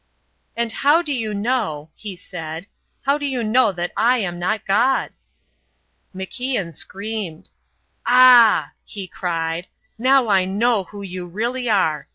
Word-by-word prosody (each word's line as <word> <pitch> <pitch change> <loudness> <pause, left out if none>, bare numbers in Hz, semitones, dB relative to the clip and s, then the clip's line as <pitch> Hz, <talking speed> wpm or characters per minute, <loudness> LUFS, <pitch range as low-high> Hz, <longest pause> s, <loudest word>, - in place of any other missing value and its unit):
"And 235 -1 -1
how 295 +8 +3
do 300 -3 -2
you 225 -4 -2
know," 200 - -2
he 205 -4 -8
said, 165 -1 -7 0.4
"how 280 +2 +1
do 290 - -3
you 255 -3 -2
know 225 0 +3
that 175 -1 -4
I 245 +2 +3
am 175 -6 -3
not 200 +4 -1
God?" 230 +7 +2 1.0
MacIan 195 0 -3
screamed. 195 -4 -6 0.6
"Ah!" 245 -3 +7
he 195 -3 -7
cried. 165 -1 -3 0.3
"Now 260 0 +4
I 195 -3 +3
know 205 +1 +1
who 205 +1 -10
you 185 -2 -6
really 235 +7 -2
are. 160 -8 +1
210 Hz, 140 wpm, -21 LUFS, 180-245 Hz, 1.0 s, Ah